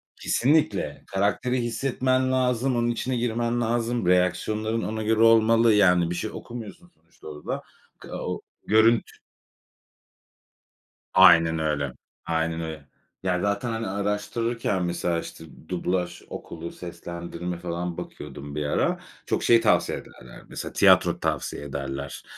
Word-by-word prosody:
Kesinlikle. 150 +5 +1
Karakteri 105 +6 0
hissetmen 130 +2 0
lazım, 130 0 +1
onun 120 0 +1
içine 125 +2 -1
girmen 120 0 0
lazım, 120 -1 0
reaksiyonların 105 +5 +1
ona 110 0 -3
göre 110 +1 +1
olmalı. 115 0 +6
Yani, 90 -4 +4
bir 90 - -2
şey 110 - -3
okumuyorsun 120 - -9
sonuçta 80 - -18
orada. 75 -1 -5 0.4
Ka - - -7
o - - -3 0.3
görüntü 110 +2 +3 2.0
Aynen 80 0 +7
öyle, 75 -4 -1 0.3
aynen 80 0 -1
öyle. 80 -3 -7 0.4
Yani, 90 -1 0
zaten, 100 +4 -1
hani, 115 0 -3
araştırırken 105 +1 -1
mesela, 85 -1 -1
işte, 80 - -9 0.3
dublaj 90 -1 -2
okulu, 85 0 -7
seslendirme 85 0 -6
falan 85 0 -4
bakıyordum 70 0 -8
bir 75 -1 -2
ara, 75 - +1 0.3
çok - - -1
şey 115 -1 +5
tavsiye - - +2
ederler - - -13
mesela, - - -6
tiyatro - - +5
tavsiye - - -2
ederler. 70 0 -5
100 Hz, 125 wpm, -25 LUFS, 85-115 Hz, 2.0 s, Aynen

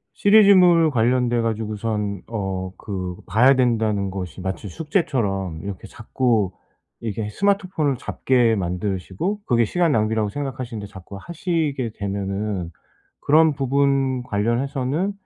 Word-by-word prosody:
시리즈물 185 -6 +6
관련돼 120 -1 +2
가지고선 110 -3 -2
어 95 -4 -3
그 95 -3 -5
봐야 125 +5 +5
된다는 110 -6 +1
것이 95 -2 -6
마치 95 +2 -4
숙제처럼 105 - -1
이렇게 100 -2 -7
자꾸 110 -4 0 0.5
이게 110 -1 -3
스마트폰을 185 - 0
잡게 120 -4 +1
만드시고 95 - -3
그게 120 -2 +3
시간 170 +6 +1
낭비라고 110 -1 +1
생각하시는데 130 -6 -5
자꾸 95 0 -11
하시게 155 - -2
되면은 100 -2 -3 0.5
그런 155 +1 +4
부분 135 -1 +1
관련해서는 130 - -1
115 Hz, 295 characters per minute, -22 LUFS, 100-140 Hz, 0.5 s, 시리즈물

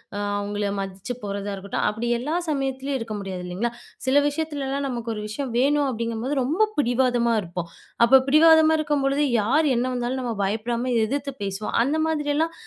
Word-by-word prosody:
அ - - -3 0.2
அவுங்கள 205 0 -2
மதிச்சு 195 +5 -5
போறதா 200 0 -3
இருக்கட்டும் 195 +1 -3
அப்டி 225 +3 -3
எல்லா 300 +7 -2
சமயத்திலேயும் 270 -1 -1
இருக்க 225 -2 -5
முடியாது, 190 -2 -5
இல்லைங்களா? 195 +7 -2 0.3
சில 265 +2 +2
விஷயத்துலலாம் 285 -2 -2
நமக்கு 235 -2 -4
ஒரு 210 - -5
விஷயம் 245 +4 -4
வேணும் 285 +2 +3
அப்டிங்கும்போது 230 +3 -2
ரொம்ப 355 +12 +2
பிடிவாதமா 245 -3 +2
இருப்போம். 175 -1 -6 0.4
அப்ப 265 +3 +7
பிடிவாதமா 320 +2 +6
இருக்கும்பொழுது 290 -1 +1 0.2
யார் 290 +9 +2
என்ன 240 +2 +1
வந்தாலும், 245 +2 -2
நம்ம 240 -2 -2
பயப்படாம 235 +5 -1
எதிர்த்து 275 +4 -2
பேசுவோம். 195 +2 -3
அந்த 285 +5 0
மாதிரியெல்லாம் 310 +1 0
250 Hz, 155 wpm, -24 LUFS, 215-285 Hz, 0.4 s, அப்ப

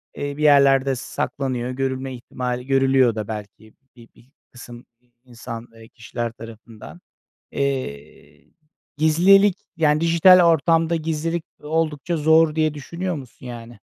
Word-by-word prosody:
eee, 145 0 -5
bir 150 - -3
yerlerde 140 -2 +4
saklanıyor. 125 -1 -4
Görülme 130 0 -3
ihtimali 125 0 -5
görülüyor 135 -3 +3
da 105 -2 -5
belki 110 0 -9 0.2
bi 115 -1 -15
bir 120 +2 -23 0.2
kısım 120 -1 -12 0.2
i 125 - -37 0.2
insan, 115 -1 -9
eee, 115 0 -15
kişiler 120 -1 -6
tarafından. 115 +7 -13 0.5
Eee, 130 - -5 0.5
gizlilik, 180 +6 +4 0.2
yani, 155 -1 +2
dijital 170 +2 +6
ortamda 165 +1 +1
gizlilik 165 +1 -3 0.2
oldukça 160 +2 -2
zor 160 0 +3
diye 155 -1 +1
düşünüyor 170 +5 -5
musun, 130 -3 -11
yani? 120 -2 -10
135 Hz, 125 wpm, -21 LUFS, 120-160 Hz, 0.5 s, dijital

